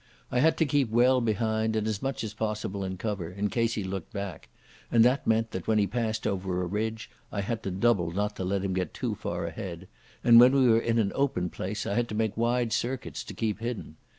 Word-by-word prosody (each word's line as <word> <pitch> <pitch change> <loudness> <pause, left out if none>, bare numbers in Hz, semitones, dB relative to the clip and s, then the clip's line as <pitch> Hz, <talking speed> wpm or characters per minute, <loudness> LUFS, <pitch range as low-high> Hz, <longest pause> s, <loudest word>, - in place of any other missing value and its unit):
I 125 - +2
had 160 +5 +4
to 160 - +3
keep 140 -4 +1
well 125 +3 +4
behind, 110 0 0
and 110 0 0
as 110 -2 -2
much 135 -4 -2
as 110 -1 -4
possible 105 -2 -3
in 95 -1 -4
cover, 100 -4 -3
in 100 +3 -2
case 115 -1 +1
he 105 - -2
looked 95 -2 -5
back; 100 -4 -6 0.4
and 115 -1 +6
that 130 +3 +2
meant 115 0 +2
that 95 - -5
when 110 - +3
he 105 - +4
had 100 - -3
passed 110 -2 -1
over 90 -1 -1
a - - -1
ridge 110 +4 -3 0.2
I 100 - -2
had 115 +3 -3
to 100 - -3
double 95 -2 +2
not 105 +4 -2
to - - -3
let 95 +1 -1
him 95 - -1
get 90 -2 -2
too - - -2
far - - -4
ahead, 85 0 -6 0.4
and 115 -1 +8
when 125 +2 +8
we 135 -2 +5
were 115 -1 +5
in 115 0 0
an 105 -3 +2
open 110 -11 0
place 105 +3 -4
I - - -1
had 120 +2 0
to 105 - -4
make 110 -1 0
wide 120 0 +1
circuits 125 +2 -2
to - - -8
keep 110 -2 -1
hidden. 115 -9 -5
110 Hz, 245 wpm, -28 LUFS, 100-115 Hz, 0.4 s, and